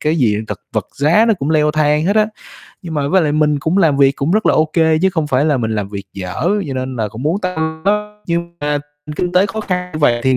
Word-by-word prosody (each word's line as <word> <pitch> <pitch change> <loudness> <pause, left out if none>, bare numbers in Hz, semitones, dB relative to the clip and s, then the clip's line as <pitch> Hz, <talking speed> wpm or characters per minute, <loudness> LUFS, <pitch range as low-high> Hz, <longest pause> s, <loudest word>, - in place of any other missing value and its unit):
cái 155 +2 0
gì 115 -8 +2
thật - - -5
vật - - -1
giá 165 +11 +4
nó 225 - +3
cũng 150 -5 -3
leo 150 -1 +3
thang 150 0 +2
hết 205 - +2
á. 215 -1 +4 0.6
Nhưng 165 -2 -6
mà 140 -2 -1
với 190 +3 +3
lại 150 -2 0
mình 150 -1 +2
cũng 160 +7 0
làm 155 -6 +3
việc 140 -1 +5
cũng 140 +4 -1
rất 215 +4 +2
là - - +4
ô 155 - +4
kê 160 -1 +3
chứ 190 - +4
không 160 -4 -1
phải 135 -1 +1
là 150 -3 +2
mình 115 -3 -2
làm 105 -2 -2
việc 100 -1 -6
dở, 95 - -3 0.2
cho 135 - -3
nên 130 0 -4
là 110 -2 -1
cũng 110 +4 -8
muốn 165 +7 0
tăng 160 -4 -3
đó 210 +1 -1
nhưng 170 0 -3
mà 145 0 0 0.4
kinh 180 +1 -1
tế 185 +2 +4
khó 220 +2 -4
khăn 180 -3 -3
như 155 - -4
vậy 120 -6 +3
thì 130 -1 +3
155 Hz, 280 wpm, -17 LUFS, 140-180 Hz, 0.6 s, việc